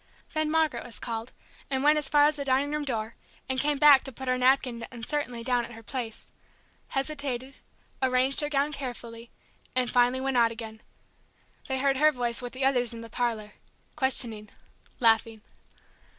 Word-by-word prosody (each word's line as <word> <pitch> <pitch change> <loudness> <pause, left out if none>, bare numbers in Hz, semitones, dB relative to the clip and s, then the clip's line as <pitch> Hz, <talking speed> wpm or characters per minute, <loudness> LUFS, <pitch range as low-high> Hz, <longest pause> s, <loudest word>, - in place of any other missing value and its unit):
Then 310 -1 0
Margaret 310 -6 +1
was 240 - -9
called, 230 +1 -5 0.4
and 265 -1 -1
went 300 +1 +5
as 295 - -3
far 290 -1 +5
as 300 +1 +3
the 285 - -3
dining 275 +2 +1
room 300 0 -1
door, 225 -5 -3 0.3
and 260 0 -1
came 295 +1 +1
back 285 -2 +7
to 270 - -4
put 265 +1 -8
her 255 - +2
napkin 255 -2 +2
uncertainly 245 0 -3
down 245 0 +1
at 235 - -9
her 225 0 -12
place, 230 -1 -6 0.6
hesitated, 270 -2 -3 0.4
arranged 260 +2 +3
her 295 - -2
gown 290 +1 +1
carefully, 240 -4 -7 0.5
and 250 -1 +1
finally 245 +1 +3
went 265 -1 0
out 230 -1 +4
again. 220 -1 -8 0.9
They 265 - -1
heard 270 0 +2
her 305 +2 +5
voice 245 -3 -2
with 245 -1 -6
the 260 +1 -1
others 245 -3 +2
in 230 - -8
the 230 -1 -11
parlor... 225 -4 -2 0.4
questioning... 235 -7 -1 0.5
laughing. 225 -1 +3
255 Hz, 175 wpm, -27 LUFS, 235-280 Hz, 0.9 s, back